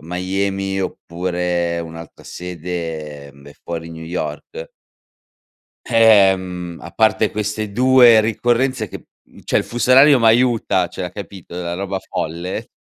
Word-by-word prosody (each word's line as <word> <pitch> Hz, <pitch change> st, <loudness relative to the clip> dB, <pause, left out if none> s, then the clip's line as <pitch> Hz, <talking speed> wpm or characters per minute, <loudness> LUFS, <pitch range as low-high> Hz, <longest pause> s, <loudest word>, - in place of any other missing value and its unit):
Miami 95 Hz, +2 st, -2 dB
oppure 85 Hz, -1 st, -2 dB
un'altra 80 Hz, -1 st, -10 dB
sede, 80 Hz, -4 st, -6 dB
ehm, 70 Hz, 0 st, -18 dB
è -, -, -13 dB
fuori 85 Hz, -1 st, -6 dB
New 80 Hz, 0 st, -9 dB
York. 90 Hz, -, -6 dB, 1.2 s
Ehm, 95 Hz, -7 st, +3 dB
a 85 Hz, -, -10 dB
parte 110 Hz, +1 st, +2 dB
queste 105 Hz, 0 st, -3 dB
2 125 Hz, 0 st, +6 dB
ricorrenze 120 Hz, +1 st, 0 dB
che, -, -, -10 dB, 0.2 s
mhmm, -, -, -19 dB
cioè -, -, +1 dB
il -, -, 0 dB
fuso 120 Hz, +1 st, -1 dB
orario 135 Hz, +1 st, +7 dB
m'aiuta, 115 Hz, -5 st, +3 dB
cioè 90 Hz, +1 st, -6 dB
capito, 95 Hz, -3 st, -10 dB
la 85 Hz, -1 st, -4 dB
roba 95 Hz, +1 st, -3 dB
folle, 85 Hz, +3 st, -5 dB
95 Hz, 125 wpm, -19 LUFS, 85-110 Hz, 1.2 s, orario